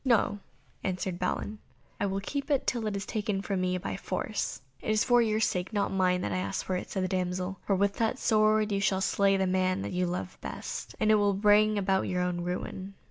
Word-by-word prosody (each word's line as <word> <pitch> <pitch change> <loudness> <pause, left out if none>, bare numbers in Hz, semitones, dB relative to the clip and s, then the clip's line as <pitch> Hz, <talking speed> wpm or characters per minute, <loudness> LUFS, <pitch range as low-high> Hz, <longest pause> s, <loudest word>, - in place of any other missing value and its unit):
"No," 220 -5 +2 0.4
answered 185 -1 -2
Balin, 205 +3 -2 0.4
"I 200 - +1
will 195 0 -2
keep 280 +7 -4
it 280 -3 +2
till 235 -3 0
it 210 - -2
is 200 - -3
taken 205 -3 -2
from 195 -3 -1
me 185 0 +1
by 100 - -4
force." - - -3 0.2
"It - - -4
is 215 0 +3
for 245 -1 +5
your 215 -2 +1
sake, 185 -2 0
not 205 -1 +1
mine, 185 -1 +2
that 105 - -2
I 95 - 0
ask 95 +2 -3
for 185 - -1
it," 180 - -4
said 190 - -2
the - - +1
damsel, 185 0 -2
"for 195 - +3
with 200 +1 +1
that 230 +3 +1
sword 215 -2 +3
you 200 - +1
shall 190 -1 +2
slay 195 +1 +3
the 190 - +1
man 185 +1 +1
you 180 0 +1
love 180 +1 -4
best, - - -6
and 215 0 +3
it - - +7
will 200 -1 +3
bring 210 +1 +4
about 195 -1 +1
your 180 -1 0
own 180 -1 -1
ruin." 185 +2 -4
195 Hz, 230 wpm, -29 LUFS, 185-215 Hz, 0.4 s, it